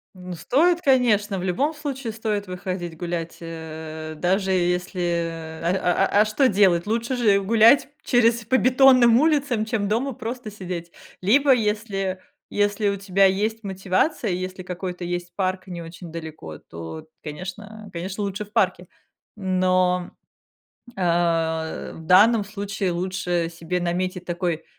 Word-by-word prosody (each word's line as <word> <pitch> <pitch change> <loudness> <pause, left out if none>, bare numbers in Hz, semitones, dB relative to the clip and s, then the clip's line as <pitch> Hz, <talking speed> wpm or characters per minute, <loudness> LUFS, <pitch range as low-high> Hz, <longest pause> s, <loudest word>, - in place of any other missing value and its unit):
Ну 180 0 -8
стоит, 335 - +2
конечно, 215 -7 +3
в 180 - -4
любом 270 - 0
случае 275 -6 -5
стоит 215 -2 -2
выходить 180 -2 -5
гулять, 170 -1 -4
э, 160 -1 -7
даже 190 +3 +1
если, 180 +1 0 0.6
а 175 +1 +1
а 205 - +5
а - - +4
что 215 +6 +2
делать? 190 -4 +3
Лучше 235 +3 -1
же 210 -5 +3
гулять 225 +7 +5 0.2
через 235 -2 +3
по 260 +3 +3
бетонным 255 -2 +6
улицам, 285 -7 +2
чем 220 -3 -1
дома 245 +6 0
просто 230 0 -6
сидеть. 180 -4 -6 0.3
Либо 265 +8 +5
если 210 -4 -1 0.3
если 205 0 +1
у 200 - +1
тебя 195 0 +2
есть 215 +4 0
мотивация, 195 - 0
если 185 +1 -4
какой-то 180 0 -5
есть 175 0 -4
парк 185 -1 -2
не 175 -2 -6
очень 165 +1 -10
далеко, 155 - -8
то, 85 - -9 0.2
конечно 205 +7 -8
конечно 185 +4 -4
лучше 200 +1 -3
в 210 - -25
парке. 185 -5 +1 0.5
Но, 185 -2 +1 0.9
э, - - -6 0.9
в - - -11
данном 205 +5 +5
случае 200 -2 -3
лучше 175 -1 -1
себе 170 +2 -3
наметить 180 +1 -2
такой 175 -2 -2
190 Hz, 140 wpm, -23 LUFS, 180-220 Hz, 0.9 s, бетонным